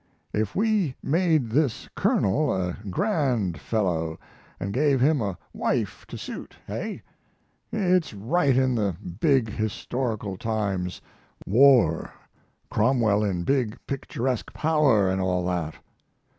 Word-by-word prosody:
If 105 Hz, -1 st, -1 dB
we 205 Hz, -, +1 dB
made 155 Hz, -6 st, +2 dB
this 140 Hz, -2 st, +1 dB
colonel 140 Hz, +9 st, +2 dB
a 90 Hz, -2 st, -1 dB
grand 120 Hz, -, 0 dB
fellow, 85 Hz, -7 st, -1 dB, 0.4 s
and 100 Hz, +2 st, -3 dB
gave 140 Hz, 0 st, +3 dB
him 145 Hz, +1 st, +3 dB
a 100 Hz, -4 st, -2 dB, 0.2 s
wife -, -, -2 dB
to -, -, -7 dB
suit -, -, -7 dB
hey? -, -, -5 dB, 0.7 s
It's 185 Hz, -5 st, +2 dB
right 130 Hz, -, +1 dB
in 130 Hz, -1 st, +3 dB
the 105 Hz, -6 st, 0 dB, 0.2 s
big 135 Hz, -7 st, +3 dB
historical 110 Hz, -1 st, -3 dB
times 100 Hz, -5 st, -2 dB, 0.4 s
war; 120 Hz, -, +4 dB, 0.6 s
Cromwell 110 Hz, -3 st, +3 dB
in 90 Hz, -4 st, -1 dB
big, 125 Hz, -2 st, 0 dB
picturesque 130 Hz, -3 st, -3 dB
power, 150 Hz, -10 st, +3 dB
and 95 Hz, 0 st, 0 dB
all 90 Hz, -1 st, 0 dB
that. 85 Hz, -4 st, -2 dB
115 Hz, 115 wpm, -25 LUFS, 95-140 Hz, 0.7 s, war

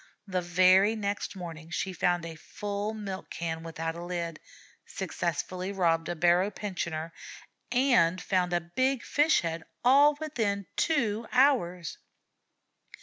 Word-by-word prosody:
The 185 Hz, -3 st, -1 dB
very 185 Hz, +4 st, +5 dB
next 205 Hz, -1 st, -3 dB
morning 165 Hz, -3 st, -8 dB
she 190 Hz, +2 st, -2 dB
found 175 Hz, 0 st, +1 dB
a 165 Hz, -, -6 dB
full 205 Hz, +6 st, -4 dB
milk 195 Hz, -3 st, -6 dB
can 165 Hz, -1 st, -4 dB
without 165 Hz, 0 st, -4 dB
a 170 Hz, +1 st, -7 dB
lid, 170 Hz, -2 st, -4 dB, 0.4 s
successfully 185 Hz, +1 st, -3 dB
robbed 170 Hz, -4 st, +1 dB
a 175 Hz, -, -2 dB
barrow 175 Hz, +3 st, +3 dB
pensioner, 170 Hz, -6 st, -4 dB, 0.6 s
and 240 Hz, -10 st, +3 dB
found 180 Hz, -1 st, 0 dB
a 175 Hz, 0 st, +1 dB
big 260 Hz, +10 st, 0 dB
fish 300 Hz, +2 st, +3 dB
head, 165 Hz, -1 st, -3 dB, 0.2 s
all 285 Hz, +4 st, +6 dB
within 220 Hz, -10 st, -1 dB
two 230 Hz, -8 st, 0 dB
hours. 230 Hz, -, +2 dB
185 Hz, 130 wpm, -29 LUFS, 170-215 Hz, 0.6 s, all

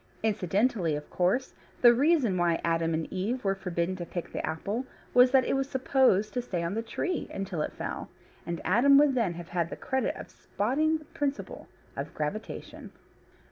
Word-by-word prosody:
Incidentally, 200 Hz, -, +1 dB
of 150 Hz, 0 st, -6 dB
course, 190 Hz, +9 st, +1 dB, 0.3 s
the 240 Hz, -1 st, +9 dB
reason 270 Hz, -, +3 dB
why 175 Hz, -2 st, +2 dB
Adam 165 Hz, -1 st, +1 dB
and 160 Hz, 0 st, -2 dB
Eve 215 Hz, +7 st, -2 dB
were 195 Hz, -1 st, +2 dB
forbidden 180 Hz, -1 st, -2 dB
to 175 Hz, -, -4 dB
pick 175 Hz, 0 st, -6 dB
the -, -, -3 dB
apple 200 Hz, +10 st, -2 dB, 0.3 s
was 250 Hz, +1 st, +7 dB
that 260 Hz, -1 st, +4 dB
it -, -, 0 dB
was 270 Hz, 0 st, 0 dB
supposed 260 Hz, -6 st, +2 dB
to 245 Hz, -, 0 dB
stay 180 Hz, -8 st, -3 dB
on 170 Hz, +3 st, -2 dB
the 225 Hz, -, -1 dB
tree 345 Hz, +9 st, -3 dB
until 190 Hz, -5 st, -3 dB
it -, -, -2 dB
fell, -, -, -5 dB, 0.3 s
and 170 Hz, -1 st, -4 dB
Adam 245 Hz, +10 st, +6 dB
would 290 Hz, -1 st, +5 dB
then 230 Hz, -9 st, 0 dB
have 170 Hz, 0 st, -8 dB
had 170 Hz, -2 st, -1 dB
the -, -, -5 dB
credit 265 Hz, -1 st, -1 dB
of -, -, -9 dB
spotting 300 Hz, +10 st, 0 dB
the 310 Hz, -, -15 dB
principle 290 Hz, -1 st, -4 dB, 0.3 s
of -, -, -6 dB
gravitation. -, -, -5 dB
210 Hz, 185 wpm, -28 LUFS, 175-260 Hz, 0.3 s, the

